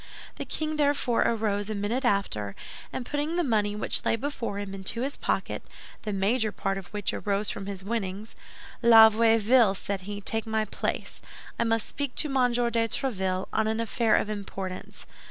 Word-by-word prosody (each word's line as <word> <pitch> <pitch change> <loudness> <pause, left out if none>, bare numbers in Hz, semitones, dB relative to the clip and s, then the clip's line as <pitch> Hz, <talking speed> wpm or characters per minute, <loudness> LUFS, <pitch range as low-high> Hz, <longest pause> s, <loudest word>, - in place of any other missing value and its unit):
The - - -4
king 310 -1 -2
therefore 285 -5 +2
arose 210 -2 0
a 215 - -2
minute 210 +6 -1
after, 195 - 0 0.4
and 250 - -4
putting 295 +4 -2
the 350 - +2
money 210 -6 +1
which 210 - 0
lay - - +2
before 230 -4 -3
him 200 -1 -5
into 195 +4 -3
his 275 +2 -2
pocket, - - -2 0.4
the 215 - -3
major 215 +3 +1
part 195 0 -2
of 190 - -11
which 205 -2 -2
arose 200 0 -1
from 195 - -6
his 195 -2 -5
winnings, 205 -1 -4 0.5
"La 225 -2 +9
Vieuville," 225 -1 +4
said 195 0 -3
he, 205 +2 -6
"take 225 +2 -1
my 220 0 +1
place; - - -4 0.4
I - - +2
must 225 -1 +1
speak 285 -3 -4
to 305 - +1
Monsieur 245 -3 +2
de 230 -1 +2
Tréville 190 -7 -1
on 220 0 +2
an 220 +1 0
affair 230 -1 +2
of - - +1
importance. 195 -3 -6
220 Hz, 180 wpm, -27 LUFS, 200-235 Hz, 0.5 s, La